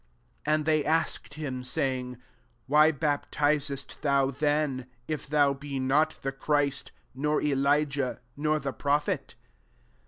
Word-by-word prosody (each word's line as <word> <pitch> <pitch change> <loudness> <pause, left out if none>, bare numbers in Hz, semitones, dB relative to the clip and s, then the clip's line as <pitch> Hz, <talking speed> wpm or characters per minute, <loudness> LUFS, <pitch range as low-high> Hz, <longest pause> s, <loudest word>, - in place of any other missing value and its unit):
25 150 +1 +3
And 155 -1 -2
they 155 -1 +3
asked 160 -1 0
him, 135 -5 -4
say 130 +1 0
ing, 125 -1 -7 0.2
" 120 - -39
Why 150 +3 +5
baptizest 145 -1 -1
thou 140 -2 +2
then, 145 -2 0 0.2
if 155 -2 -3
thou 145 -1 +3
be 140 0 -6
not 145 +4 +2
the 135 - -1
Christ, 140 0 0 0.2
nor 150 +4 0
Elijah, 140 -1 +1 0.2
nor 155 +1 +1
the 135 -3 -3
prophet 145 +1 -1
145 Hz, 135 wpm, -28 LUFS, 135-150 Hz, 0.2 s, Why